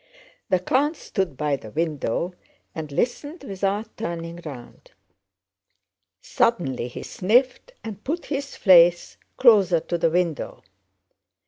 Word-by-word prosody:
The 185 - +4
count 280 - +1
stood 185 -9 -3
by 150 -2 0
the 110 - -11
window 160 - -2 0.4
and 155 -2 -6
listened 285 - -2
without 200 0 -3
turning 170 -4 -5
round. 140 - -10 1.3
Suddenly 135 - 0
he 125 - -8
sniffed 250 - +1
and 210 -2 -8
put 330 +6 -3
his 280 -1 -4
face 175 -3 +5 0.2
closer 200 -9 +5
to 170 +2 -3
the 165 - +3
window. 170 -2 -2
180 Hz, 115 wpm, -24 LUFS, 165-235 Hz, 1.3 s, face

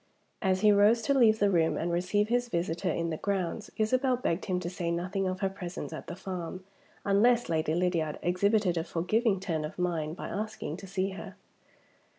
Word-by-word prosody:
As 190 -2 +1
he 210 -1 +6
rose 210 +3 +5
to 280 - +2
leave 230 -5 +5
the 205 -2 +3
room 165 -3 +2
and 170 +1 -1
receive 180 +4 +1
his 245 0 +1
visitor 170 -3 -1
in 170 0 -1
the 160 - -2
grounds, 200 +2 -2
Isabel 255 +4 +2
begged 175 -7 -1
him 185 -2 0
to 175 - -4
say 175 -1 -3
nothing 185 +3 -1
of 185 +1 -3
her 195 - +1
presence 180 -3 -6
at 155 - -7
the 170 - -5
farm, 185 -1 -6 0.4
unless 230 +5 +3
Lady 160 -1 +1
Lydiard 170 -4 0
exhibited 185 +1 +2
a 165 - 0
forgiving 195 +5 +1
turn 165 -5 -2
of 150 - -6
mind 165 -3 -1
by - - -5
asking 215 -6 -4
to 195 - -10
see 195 +1 -1
her. 190 - -8
185 Hz, 195 wpm, -29 LUFS, 170-210 Hz, 0.4 s, he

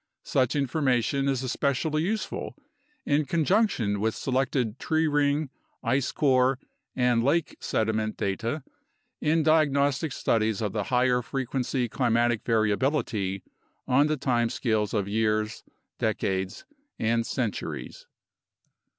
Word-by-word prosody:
Such 130 +2 +1
information 140 -1 +1
is 135 -2 -1
especially 140 +4 0
useful 210 +6 -3 0.5
in 145 +1 +2
conjunction 160 - +1
with 110 +2 0
selected 130 -3 -1
tree 160 0 +1
ring, 145 -1 +1 0.3
ice 130 +2 +1
core, 130 -2 +3 0.4
and 125 -2 +2
lake 150 +5 +1
sediment 110 0 -1
data 115 +9 -2 0.6
in 155 +1 +2
diagnostic 145 -1 +2
studies 110 -4 0
of 105 -3 -2
the 105 -2 -1
higher 125 -1 +2
frequency 130 0 -2
climatic 120 -2 +1
variability 110 -3 0 0.4
on 140 +4 +4
the 155 0 0
time 120 -3 +1
scales 110 -4 0
of 100 -2 0
years, 110 0 0 0.4
decades, 95 0 -1 0.3
and 115 +1 +1
centuries. 120 -7 -4
125 Hz, 110 wpm, -27 LUFS, 110-140 Hz, 0.6 s, on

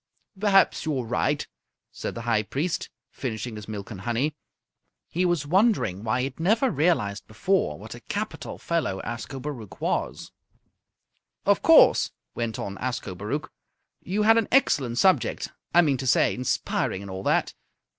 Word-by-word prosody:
"Perhaps 195 -2 +4
you're 145 -5 -1
right," 135 +5 0 0.4
said - - -5
the 115 - -5
High 115 -2 +2
Priest, 145 - -2 0.2
finishing 115 -2 -4
his 105 -1 -8
milk 105 -1 -6
and 95 -4 -7
honey. 125 +7 0 0.7
He 180 +2 0
was 175 -5 +1
wondering 175 - +2
why 125 +3 0
he - - -1
had 135 +2 -5
never 220 +10 +3
realized 135 - +1
before 110 - 0
what - - -9
a - - -9
capital - - -5
fellow 165 - -1
Ascobaruch 120 0 -6
was. - - -2 1.1
"Of - - +3
course," - - +6 0.2
went 115 -2 -3
on 100 -1 -5
Ascobaruch, 120 +1 -4 0.5
"you 205 +4 -1
had 225 +1 +6
an 225 - -1
excellent 140 - +3
subject. 190 +6 +2 0.2
I 175 - +6
mean 140 -4 +2
to 130 - -4
say, - - +4
inspiring 125 -5 -1
and 100 - -8
all 95 0 -5
that. - - +1
130 Hz, 150 wpm, -26 LUFS, 110-175 Hz, 1.1 s, course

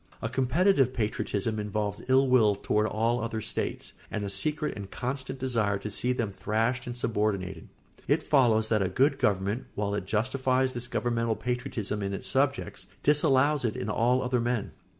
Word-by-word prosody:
A - - -3
competitive 135 0 +2
patriotism 110 -1 -1
involves 105 0 -2
ill 135 +1 +5
will 115 -5 +4
toward 105 +2 0
all 115 +3 0
other 115 -1 -3
states - - -4 0.2
and 105 - -3
a 100 - -4
secret 150 +10 -1
and 100 -2 -7
constant 130 +3 -4
desire 115 -6 0
to 105 +2 -6
see 125 +5 0
them 115 -5 -1
thrashed 115 +6 -1
and 120 0 -5
subordinated. 100 -6 -1 0.4
It - - +2
follows 115 -6 +3
that 110 -2 +2
a 95 - +1
good 135 +8 +2
government, 100 +4 0
while 100 -1 -1
it 100 -2 -3
justifies 130 +4 +1
this 120 -1 -3
governmental 115 -2 0
patriotism 120 -4 -3
in 100 0 -2
its - - -6
subjects, - - 0 0.2
disallows 145 -1 +3
it 115 -3 0
in 100 - -4
all 125 +4 +2
other 125 -1 +1
men. 120 -3 -1
115 Hz, 170 wpm, -28 LUFS, 105-130 Hz, 0.4 s, ill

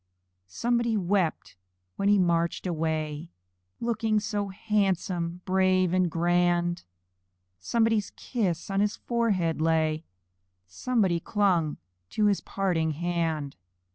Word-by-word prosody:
Somebody 235 - 0
wept 185 -3 -1 0.4
when 200 0 +1
he 205 - +5
marched 170 -2 +1
away, 160 -2 -2 0.5
Looking 225 -2 0
so 205 -1 -2
handsome, 190 -4 -1
brave, 185 -1 +2
and 185 -1 +2
grand! 175 +1 +1 0.7
Somebody's 225 - +1
kiss 195 -7 -2
on 195 - +1
his 205 +1 +1
forehead 200 -10 0
lay 160 -1 +1 0.6
Somebody 185 - 0
clung 175 -6 +1 0.3
to 215 - +1
his 205 -2 +2
parting 170 -5 -1
hand. 165 -3 -2
180 Hz, 105 wpm, -27 LUFS, 165-205 Hz, 0.7 s, he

